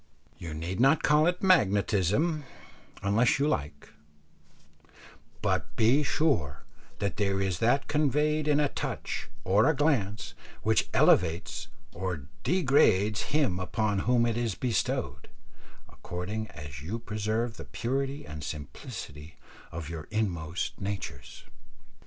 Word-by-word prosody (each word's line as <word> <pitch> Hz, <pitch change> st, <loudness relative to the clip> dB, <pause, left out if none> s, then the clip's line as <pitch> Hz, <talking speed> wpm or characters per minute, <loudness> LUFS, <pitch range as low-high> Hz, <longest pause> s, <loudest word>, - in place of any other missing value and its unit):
You 80 Hz, -3 st, -6 dB
need 85 Hz, +4 st, -4 dB
not 135 Hz, +5 st, +4 dB
call 150 Hz, +2 st, +4 dB
it 180 Hz, +1 st, 0 dB
magnetism 110 Hz, -, +3 dB, 0.6 s
unless 110 Hz, +5 st, +3 dB
you 140 Hz, +2 st, +2 dB
like, 75 Hz, -, -3 dB, 1.5 s
but -, -, -1 dB
be 120 Hz, +7 st, +4 dB
sure 135 Hz, -, 0 dB, 0.3 s
that 100 Hz, -, -2 dB
there 100 Hz, -2 st, +1 dB
is 95 Hz, -3 st, -1 dB
that 120 Hz, +5 st, +2 dB
conveyed 150 Hz, +1 st, +1 dB
in 150 Hz, -1 st, +4 dB
a 145 Hz, -, +3 dB
touch -, -, -4 dB
or 100 Hz, +8 st, +4 dB
a 160 Hz, -, +2 dB
glance 125 Hz, -9 st, 0 dB, 0.3 s
which -, -, +2 dB
elevates 85 Hz, +5 st, +2 dB, 0.3 s
or 90 Hz, -5 st, -3 dB, 0.2 s
degrades 125 Hz, -, +3 dB
him 140 Hz, -12 st, +1 dB
upon 105 Hz, +2 st, 0 dB
whom 120 Hz, +3 st, +3 dB
it 115 Hz, -1 st, 0 dB
is 115 Hz, -4 st, -1 dB
bestowed, 120 Hz, -4 st, -2 dB, 0.6 s
according 105 Hz, +5 st, -5 dB
as 75 Hz, -8 st, -9 dB
you 90 Hz, +10 st, -4 dB
preserve 110 Hz, +1 st, -2 dB
the -, -, -8 dB
purity 135 Hz, +4 st, -2 dB
and 75 Hz, -1 st, -7 dB
simplicity 75 Hz, -, -7 dB, 0.4 s
of 80 Hz, -2 st, -6 dB
your 80 Hz, -2 st, -6 dB
inmost 90 Hz, -7 st, -2 dB
natures. 100 Hz, 0 st, -5 dB
110 Hz, 120 wpm, -29 LUFS, 90-140 Hz, 1.5 s, not